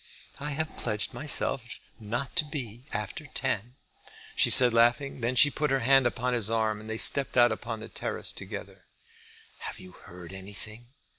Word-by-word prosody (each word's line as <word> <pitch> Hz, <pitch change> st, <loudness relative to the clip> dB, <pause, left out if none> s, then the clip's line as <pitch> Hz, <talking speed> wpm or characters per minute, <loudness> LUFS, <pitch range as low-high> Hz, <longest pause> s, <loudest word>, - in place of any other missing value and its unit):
"I 145 Hz, +1 st, -4 dB
have 160 Hz, +2 st, -3 dB
pledged 105 Hz, -1 st, -2 dB
myself 140 Hz, -4 st, 0 dB, 0.4 s
not 120 Hz, +5 st, -4 dB
to 160 Hz, -, +4 dB
be 125 Hz, -5 st, -7 dB
after 105 Hz, +8 st, -5 dB
ten," 125 Hz, -3 st, -3 dB, 0.6 s
she -, -, +4 dB
said, 125 Hz, -2 st, +7 dB
laughing. 120 Hz, +3 st, +2 dB
Then 120 Hz, +2 st, -1 dB
she 145 Hz, +4 st, +6 dB
put 150 Hz, +2 st, -1 dB
her 135 Hz, 0 st, +1 dB
hand 135 Hz, +1 st, +5 dB
upon 125 Hz, +1 st, -2 dB
his 115 Hz, -4 st, +2 dB
arm, 110 Hz, -2 st, 0 dB
and 110 Hz, -, -10 dB
they 110 Hz, -, -3 dB
stepped 135 Hz, +3 st, +5 dB
out 120 Hz, -1 st, +6 dB
upon 110 Hz, 0 st, -5 dB
the -, -, -7 dB
terrace -, -, -5 dB
together. -, -, -8 dB, 0.7 s
"Have -, -, -7 dB
you 95 Hz, -, -12 dB
heard 90 Hz, 0 st, -12 dB
anything?" 105 Hz, +4 st, -10 dB
120 Hz, 170 wpm, -28 LUFS, 110-135 Hz, 0.7 s, said